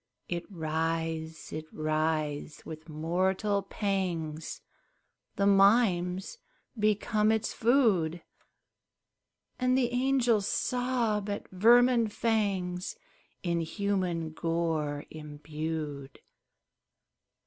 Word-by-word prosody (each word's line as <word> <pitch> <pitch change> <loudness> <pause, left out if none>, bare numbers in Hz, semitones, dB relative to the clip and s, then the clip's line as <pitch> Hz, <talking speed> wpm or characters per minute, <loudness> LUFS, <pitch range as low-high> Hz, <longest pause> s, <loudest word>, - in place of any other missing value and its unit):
It 175 +2 -4
writhes! 160 -1 -2
it 155 0 -5
writhes! 155 -1 -1
with 160 +1 -9
mortal 185 +6 0
pangs 180 -6 -3 0.7
The 200 - +1
mimes 195 - +3 0.4
become 215 0 +2
its 220 0 0
food, 205 - +2 1.4
And 255 0 +3
the 245 -2 +1
angels 245 -5 +2
sob 240 -6 0
at 205 - -4
vermin 235 +4 +5
fangs 200 -5 -1 0.5
In 170 -2 0
human 180 -2 -1
gore 160 -3 -1
imbued. 150 -2 -5
180 Hz, 80 wpm, -30 LUFS, 160-215 Hz, 1.4 s, vermin